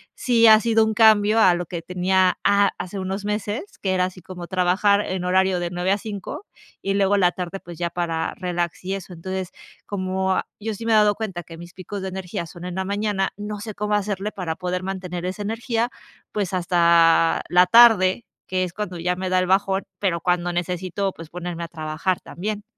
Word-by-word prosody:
sí 230 -2 +4
ha 215 0 +9
sido 225 0 +3
un 220 0 0
cambio 215 -1 +5
a 185 -5 +6
lo 175 0 -3
que 170 -1 -6
tenía 185 +1 +1
a 200 0 +4
hace 185 +2 -5
unos 190 +1 -3
meses, 210 - -4
que 190 -1 +1
era 180 -1 +2
así 185 0 -8
como 175 -1 -8
trabajar 185 +3 +2
en 185 -3 -3
horario 185 0 +2
de 175 0 -2
9 180 +2 -1
a 200 - +1
5, 205 - -7 0.3
y 195 0 -1
luego 200 0 +3
la 180 -3 +4
tarde, 180 +1 -5
pues, 175 -3 -11
ya 170 0 -2
para 165 -2 -2
relax 175 -2 -3
y 190 +2 -2
eso. 185 -1 -8
Entonces, 185 +2 -5 0.4
como, 190 -1 -2
ah, - - -1
yo 220 +1 -3
sí 225 +3 -6
me - - +2
he - - +6
dado 210 -1 +5
cuenta 195 -5 -5
que 165 +1 -11
mis 175 +1 -11
picos 190 +2 -6
de 190 - -4
energía 185 -2 -5
son 175 +2 -10
en 180 - -5
la 190 +1 -2
mañana, 200 0 -1
no 210 0 -5
sé, 215 0 -7
cómo 210 0 -2
hacerle 205 0 -1
para 180 -6 -4
poder 180 +1 -3
mantener 185 -2 -5
esa 190 +3 -4
energía, 230 +2 -1 0.4
pues, 200 -4 -2
hasta 170 -2 +4
la 180 +1 +5
tarde, 225 -1 +6 0.2
que 185 0 0
es 180 -1 -4
cuando 195 -3 -5
ya 180 +2 -1
me 185 0 -3
da 185 - +2
el 185 - +2
bajón, 190 +1 +1 0.2
pero 185 -4 0
cuando 175 0 0
necesito, 180 +2 -2
pues, 165 -1 -11
ponerme 175 -1 -5
a - - -5
trabajar 160 +2 -2
también. 210 +3 -5
185 Hz, 215 wpm, -23 LUFS, 175-205 Hz, 0.4 s, ha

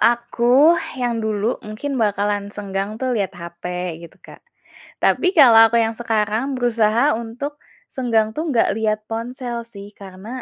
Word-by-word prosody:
aku 240 +5 +4 0.2
yang 240 -2 -1
dulu 220 +1 -1
mungkin 240 +5 -5
bakalan 205 -1 0
senggang 200 0 -4
tuh 260 -1 -1
lihat 200 -5 -1
hape 170 0 -6
gitu, 170 - -13
Kak. - - -14 0.6
Tapi 365 - +3
kalau 250 -7 +8
aku 235 - 0
yang 225 - -1
sekarang 225 +3 -1
berusaha 235 +2 +2
untuk, 250 +6 -6 0.4
senggang 225 -4 +1
tuh 310 - -2
nggak 240 -5 +2
lihat 215 -1 0
ponsel 240 +1 -4
sih, 200 -3 -10
karena 190 +1 -11
225 Hz, 145 wpm, -20 LUFS, 205-245 Hz, 0.6 s, kalau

